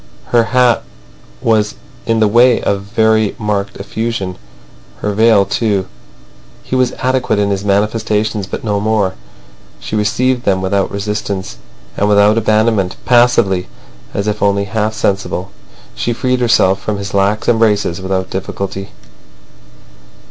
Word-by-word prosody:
Her 120 -1 +3
hat 125 +1 +3 0.6
was 110 -2 +1 0.3
in 115 -1 +1
the 110 - +5
way 120 +3 +4
of 100 -1 -1
very 110 +1 +1
marked 105 -3 -2
effusion; 105 -2 -3 0.7
her 105 - -1
veil 110 -1 +4
too. 100 -1 0 0.8
He - - -3
was 130 -1 +2
adequate 130 -3 0
in 100 0 +1
his 100 0 -2
manifestations, 105 0 0
but - - -6
no 105 -2 0
more. 105 -2 0 0.7
She - - -5
received 120 +4 +1
them 95 -4 +1
without 95 +1 0
resistance 100 -1 -4 0.4
and 100 - +1
without 105 +1 +5
abandonment, 110 -3 +1
passively, 120 -7 +3 0.4
as 100 +1 -3
if 105 0 -2
only 100 0 +2
half 110 +2 -2
sensible. 100 -2 -2 0.4
She 120 - -2
freed 125 +2 0
herself 115 -5 +3
from 105 -1 -2
his 100 0 -6
lax 100 +2 +1
embraces 105 -6 +2
without 95 0 -2
difficulty. 95 +1 -4
105 Hz, 135 wpm, -15 LUFS, 100-115 Hz, 0.8 s, the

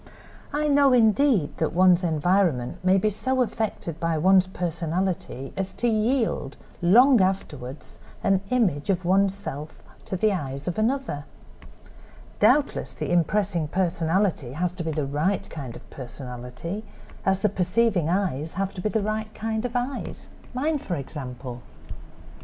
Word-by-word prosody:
I 300 +1 0
know, 280 -2 +5
indeed, 230 - +3
that 160 - 0
one's 180 0 +5
environment 165 -5 +1
may 185 +1 +4
be 210 +3 +2
so 260 +5 +1
affected 215 -8 -3
by 165 -1 0
one's 185 +3 +5
personality 170 -5 -3
as 190 0 -3
to 240 - -1
yield, 225 - 0 0.2
long 240 +7 +6
afterward, 150 -8 -2 0.4
an 195 -1 +3
image 200 - +1
of 185 -2 +1
one's 195 +2 +3
self 155 -6 -7 0.2
to - - -3
the 215 +2 +2
eyes 140 -5 -4
of 180 +4 -2
another. 225 - -1 1.1
Doubtless 260 +7 +2
the - - -3
impressing 175 -1 +1
personality 170 -4 0
has 175 +4 -1
to 180 -1 -6
be 160 - -2
the 150 -2 -1
right 150 +8 0
kind 135 -7 -6
of - - -12
personality 125 - -7 0.4
as 190 0 +1
the 210 - +3
perceiving 190 -2 +1
eyes 165 -5 -1
have 195 +1 -1
to 180 - -6
be 215 - 0
the 220 -1 0
right 215 +1 -2
kind 220 +1 -2
of 245 - -3
eyes—mine, 260 +3 -3
for 180 - -3
example." 130 -4 -7
185 Hz, 145 wpm, -25 LUFS, 155-215 Hz, 1.1 s, long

